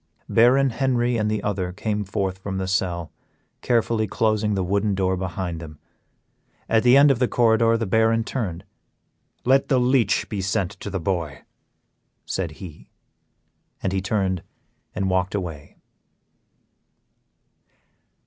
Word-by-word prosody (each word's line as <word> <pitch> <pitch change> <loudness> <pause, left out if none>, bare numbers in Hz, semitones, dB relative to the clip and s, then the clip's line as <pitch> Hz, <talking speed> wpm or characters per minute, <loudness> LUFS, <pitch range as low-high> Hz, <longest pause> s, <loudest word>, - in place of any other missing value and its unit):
Baron 130 +3 +4
Henry 125 0 0
and 105 -2 0
the 110 0 -2
other 95 -3 -2
came 105 +2 -2
forth 95 -1 -3
from 95 0 -5
the 95 0 -2
cell, 90 -3 -1 0.5
carefully 115 -2 +1
closing 105 0 0
the 95 - 0
wooden 100 +2 0
door 95 -1 +1
behind 90 -2 -4
them. 75 -2 -10 0.9
At 110 -1 +3
the 125 +3 +6
end 140 0 +7
of 130 - 0
the 125 - +2
corridor 115 -1 +3
the 115 - -2
Baron 110 +2 +2
turned, 100 -9 -4 0.8
"Let 135 +2 +3
the 135 - +2
leech 125 -1 +2
be 105 -3 -3
sent 95 -1 -1
to - - -6
the 95 -1 -3
boy," 80 -5 -3 0.8
said 85 -5 -3
he. 85 -3 -11 0.9
And 95 - 0
then 95 - -1
he - - 0
turned 95 -2 -1 0.5
and 95 - -1
walked 95 +1 0
away. 80 -7 -6
100 Hz, 140 wpm, -23 LUFS, 95-115 Hz, 0.9 s, end